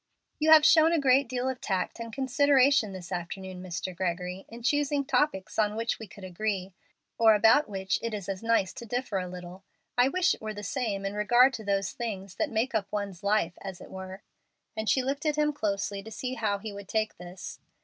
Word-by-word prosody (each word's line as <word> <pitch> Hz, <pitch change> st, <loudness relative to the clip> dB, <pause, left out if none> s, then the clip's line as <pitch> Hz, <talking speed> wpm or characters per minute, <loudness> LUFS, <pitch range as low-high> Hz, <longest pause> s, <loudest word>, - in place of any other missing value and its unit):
"You 310 Hz, +1 st, +2 dB
have 310 Hz, -1 st, +9 dB
shown 320 Hz, 0 st, +6 dB
a 330 Hz, -, +3 dB
great 270 Hz, -2 st, +4 dB
deal 250 Hz, 0 st, -2 dB
of 260 Hz, -1 st, -3 dB
tact 190 Hz, +3 st, -2 dB
and 230 Hz, 0 st, -6 dB
consideration 270 Hz, -1 st, +3 dB
this 185 Hz, -1 st, -9 dB
afternoon, 180 Hz, +1 st, -5 dB
Mr. 185 Hz, 0 st, -5 dB
Gregory, 180 Hz, +1 st, -3 dB
in 235 Hz, +1 st, -10 dB
choosing 290 Hz, +1 st, +1 dB
topics 265 Hz, -11 st, 0 dB
on 210 Hz, -1 st, +2 dB
which 230 Hz, +1 st, -2 dB
we 220 Hz, -, -8 dB
could 195 Hz, +1 st, -13 dB
agree, 190 Hz, 0 st, -3 dB, 0.5 s
or 220 Hz, -1 st, +7 dB
about 225 Hz, +7 st, +5 dB
which 190 Hz, -1 st, -1 dB
it 230 Hz, -, -3 dB
is 205 Hz, -4 st, -5 dB
as 195 Hz, -1 st, -4 dB
nice 225 Hz, -5 st, +1 dB
to 235 Hz, -, -8 dB
differ 245 Hz, -4 st, -2 dB
a 180 Hz, -, -4 dB
little. 180 Hz, +1 st, -9 dB, 0.4 s
I 245 Hz, -, +6 dB
wish 370 Hz, +5 st, +2 dB
it -, -, -10 dB
were 215 Hz, -1 st, -5 dB
the 205 Hz, -, -7 dB
same 205 Hz, -3 st, -2 dB
in 195 Hz, -, -2 dB
regard 240 Hz, +6 st, +4 dB
to 225 Hz, -, -6 dB
those 195 Hz, -1 st, 0 dB
things 200 Hz, -6 st, -6 dB
that -, -, 0 dB
make 230 Hz, +4 st, -1 dB
up 205 Hz, -3 st, -1 dB
one's 200 Hz, -4 st, -4 dB
life, 200 Hz, -4 st, 0 dB
as 190 Hz, -3 st, -7 dB
it -, -, -12 dB
were;" 190 Hz, +1 st, -8 dB, 0.5 s
and 220 Hz, 0 st, -2 dB
she 260 Hz, -, +3 dB
looked 275 Hz, +3 st, -2 dB
at 300 Hz, -, +2 dB
him 300 Hz, 0 st, +2 dB
closely 200 Hz, -5 st, -2 dB
to 220 Hz, -, -10 dB
see 250 Hz, +4 st, -4 dB
how 215 Hz, -5 st, 0 dB
he 210 Hz, +1 st, -7 dB
would 200 Hz, -1 st, -9 dB
take 220 Hz, +1 st, -1 dB
this. 180 Hz, +1 st, -9 dB
215 Hz, 220 wpm, -28 LUFS, 190-255 Hz, 0.5 s, have